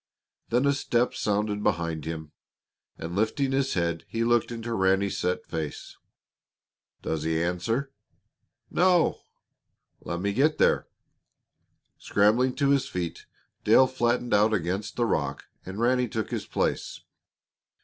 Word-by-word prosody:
Then 125 +4 +2
a 140 - +4
step 125 -3 0
sounded 105 0 -1
behind 85 -5 -1
him, 80 -2 -5 0.7
and 85 +2 -6
lifting 120 +6 0
his 135 0 0
head, 85 -2 -1
he 115 0 -2
looked 120 0 +2
into 115 0 -4
Ranny's 95 0 +1
set 90 0 -1
face. 80 -3 -5 1.1
"Does 80 -1 -2
he 80 +1 0
answer?" 115 +10 -1 0.8
"No." 180 -2 +3 0.8
"Let 85 - -4
me 100 +2 -1
get 145 +7 +2
there." - - +3 1.1
Scrambling 115 +6 +2
to 140 -2 +1
his 140 -2 +2
feet, 85 -2 -5 0.4
Dale 130 - +6
flattened 120 -2 0
out 105 +1 +4
against 95 +3 -3
the 120 - +1
rock 70 -10 -1 0.2
and 95 +3 -6
Ranny 125 +1 +2
took 110 -1 -4
his - - -3
place. - - -2
105 Hz, 130 wpm, -27 LUFS, 90-125 Hz, 1.1 s, Dale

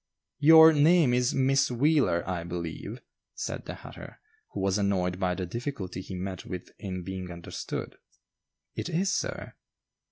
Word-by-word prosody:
"Your 160 +2 +9
name 155 -2 +4
is 125 0 +1
Miss 135 +1 +3
Wheeler, 130 - +2
I 90 -2 -2
believe," 85 -1 -6 0.3
said - - -5
the - - -6
hatter, - - -11 0.3
who - - -6
was 95 +1 +1
annoyed 90 -2 0
by 90 -2 0
the 95 - -3
difficulty 105 - -5
he 95 - -8
met 95 0 -5
with 90 -1 -7
in 90 -3 -5
being 95 0 -6
understood. 85 -1 -6 0.8
"It - - -4
is, 190 +4 0
sir." - - -3
100 Hz, 150 wpm, -28 LUFS, 90-140 Hz, 0.8 s, Your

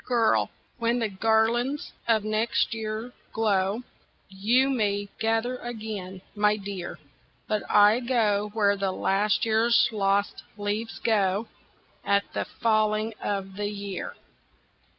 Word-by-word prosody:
Girl! 235 -3 +2 0.3
when 235 +1 +1
the 225 -3 0
garlands 225 +7 +1 0.2
of 220 -2 +3
next 215 +2 0
year 220 +2 -4 0.2
glow, 210 0 +1 0.5
YOU 220 +8 +2
may 205 -6 0
gather 225 +3 0
again, 215 -6 -6
my 210 0 +2
dear 195 -3 -6 0.5
But 215 -1 0
I 210 +3 +6
go 215 -5 +1
where 205 -2 +3
the 195 -1 -1
last 195 +3 +1
year's 225 +1 +4
lost 200 -1 0 0.2
leaves 210 +2 -3
go 205 -1 +1 0.6
At 200 0 +2
the - - -1
falling 215 -1 +1
of 195 -1 -3
the 205 0 -1
year." 200 -2 -5
215 Hz, 120 wpm, -26 LUFS, 200-225 Hz, 0.6 s, I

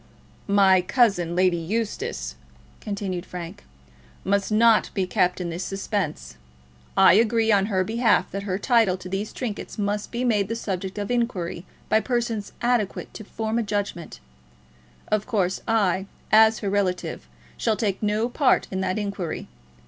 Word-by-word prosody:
"My 195 -2 +5
cousin, 180 -5 +2
Lady 180 -1 +3
Eustace," 225 - -3 0.5
continued 195 -4 -4
Frank, 180 +2 -8 0.6
"must 200 +1 0
not 225 0 +4
be 190 -3 +1
kept 180 0 +1
in 175 -2 -3
this 170 +3 -4
suspense. 195 - -3 0.6
I - - +7
agree 225 +1 +3
on 200 -1 +3
her 190 -3 +1
behalf 230 +4 +2
that 195 - -3
her 195 -2 -2
title 220 -4 +3
to 185 - -9
these 195 +3 -3
trinkets 230 -5 -5
must 205 0 -2
be 240 +1 -2
made 210 -5 +2
the 230 - -3
subject 190 -3 -4
of 205 +2 -3
inquiry 190 -8 -2 0.2
by 220 - +4
persons 230 -2 -2
adequate 240 -5 0
to 215 - -8
form 220 +2 -2
a - - +1
judgment. 205 -5 -4 0.9
Of 215 -1 0
course, 190 -4 0
I, 195 -4 +1 0.2
as 220 0 +6
her - - +1
relative, 190 -3 -1 0.3
shall 225 -2 0
take 200 -4 -1
no 210 +2 +1
part 255 +1 +2
in 190 0 -2
that 185 +1 -1
inquiry. 200 -5 -4
205 Hz, 155 wpm, -24 LUFS, 185-225 Hz, 0.9 s, I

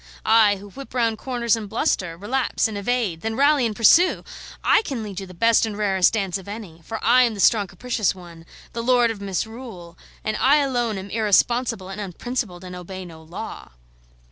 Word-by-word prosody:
I, 220 -2 +5
who 200 +1 -12
whip 275 +2 -10
round 230 -3 +1
corners 240 -4 0
and 215 -3 -6
bluster, 190 - -1
relapse 240 +6 0
and 220 - -7
evade, 200 -5 -1
then 225 0 -3
rally 280 -1 +3
and 215 - -5
pursue! 335 - +5 0.4
I - - +4
can 265 - -4
lead 200 -2 -6
you 195 - -7
the 185 - -12
best 230 +5 +4
and 215 -2 -2
rarest 195 -3 +2
dance 195 -3 -1
of 190 - -14
any; 200 -6 -8
for 225 +7 -5
I 245 +3 +6
am 235 -3 +2
the - - -9
strong 205 0 +4
capricious 215 +1 -1
one, 170 -2 -13 0.3
the 235 - -3
lord 240 -1 +3
of 210 -3 -8
misrule, 200 -2 -5 0.3
and 215 - -1
I 275 +3 +4
alone 245 -7 0
am 195 +1 -8
irresponsible 225 -1 +1
and 195 +2 -6
unprincipled, 200 -1 -4
and 180 0 -8
obey 185 +1 -8
no 165 -2 -12
law." 170 - -9
215 Hz, 195 wpm, -23 LUFS, 190-240 Hz, 0.4 s, I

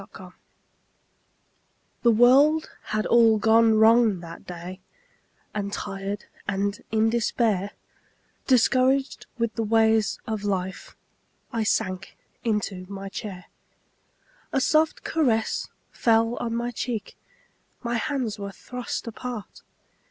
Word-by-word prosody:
MY - - -13
COMFORTER - - -12 1.7
The 240 - +4
world 275 +7 +5
had 215 0 -1
all 230 -2 +5
gone 225 +1 +4
wrong 220 -2 +5
that 170 -1 -11
day 180 +1 -7 0.7
And 200 -1 -3
tired 200 0 -5 0.2
and 200 0 -1
in 220 0 +2
despair, 215 -4 0 0.7
Discouraged 260 +2 +2
with 230 -1 -1
the 230 - -2
ways 220 -1 +3
of 220 -2 -3
life, 190 -2 -3 0.6
I 230 - 0
sank 185 -3 -1 0.3
into 200 -5 -2
my 195 0 -6
chair. 195 -3 -7 1.1
A - - +1
soft 310 +4 +2
caress 235 -9 0 0.2
fell 230 0 +2
on 230 -1 -2
my 240 +1 -2
cheek, 230 -3 -4 0.7
My 235 0 -1
hands 240 -4 -2
were 200 0 -5
thrust 250 +4 -6
apart. 230 -2 -7
220 Hz, 115 wpm, -25 LUFS, 200-235 Hz, 1.7 s, world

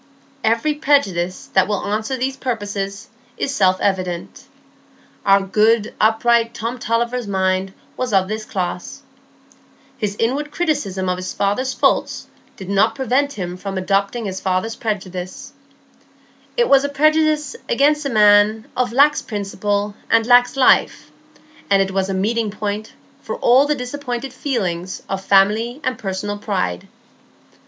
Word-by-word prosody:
Every 230 +7 +2
prejudice 205 - 0
that 190 -1 +4
will 205 -1 -2
answer 215 +5 -2
these 260 +2 -2
purposes 205 -6 -4 0.3
is 275 - -2
self 185 -7 +2
evident. 185 -3 -2 0.8
Our 195 0 +5
good, 215 +3 +2
upright 230 +1 +3
Tom 235 +3 -4
Tulliver's 235 0 -1
mind 190 -1 0 0.2
was 255 -1 -3
of 190 -2 +3
this 215 +2 -4
class; 180 -3 -5 1.0
his 205 -3 -2
inward 275 +6 -1
criticism 290 - -1
of 180 0 0
his 185 0 -5
father's 255 +7 0
faults - - +1 0.3
did 190 - -9
not 200 0 +2
prevent 270 +2 0
him 180 -3 -5
from 195 +1 -5
adopting 200 +4 0
his 190 -1 -4
father's 190 +4 -1
prejudice; 185 -4 -5 1.0
it 480 -1 +3
was 275 0 +5
a 285 - -1
prejudice 305 0 +2
against 295 +4 +2
a 280 - -2
man 210 0 +4
of 250 -1 0
lax 285 +4 +4
principle 205 0 -2 0.2
and 225 -1 +3
lax 245 +2 +4
life, 260 - +3 0.6
and 200 -1 +4
it 195 0 +1
was 190 0 -1
a 195 - -1
meeting 220 +3 0
point 210 +1 -4 0.3
for - - -5
all 260 +4 +4
the 300 - +1
disappointed 250 -1 -5
feelings 190 -10 -3
of 195 0 -4
family 210 +7 +3
and 255 -3 -2
personal 205 +1 -4
pride. 185 - -2
215 Hz, 140 wpm, -19 LUFS, 195-255 Hz, 1.0 s, Our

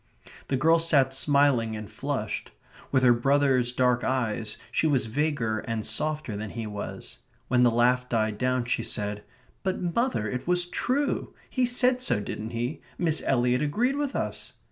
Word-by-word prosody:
The 135 - 0
girl 165 +5 +4
sat 140 -5 +3
smiling 135 -5 +2
and 105 -1 -6
flushed. - - -4 0.4
With 130 -2 +3
her 125 -1 +7
brother's 130 0 +2
dark 125 -1 +2
eyes, 115 -4 -1
she 160 - +2
was 135 -6 +2
vaguer 115 -3 -1
and 115 -1 -4
softer 155 -7 -1
than 105 +1 -5
he 115 +2 -5
was. 105 -1 -6 0.3
When 125 -1 +3
the 125 - +6
laugh 125 +2 +2
died 110 -2 0
down 125 -1 +1
she 125 - 0
said: 105 0 -2 0.4
"But, 190 -1 -1
mother, 180 - 0
it 125 +7 -4
was 180 0 +2
true. 270 +10 -1 0.2
He 255 -2 +1
said 250 +1 +2
so, 255 - +1
didn't 105 +2 -5
he? 120 +5 -3 0.2
Miss 160 -3 +1
Eliot 125 0 +2
agreed 235 - +1
with 285 -1 -2
us...." - - -4
130 Hz, 165 wpm, -27 LUFS, 115-155 Hz, 0.4 s, her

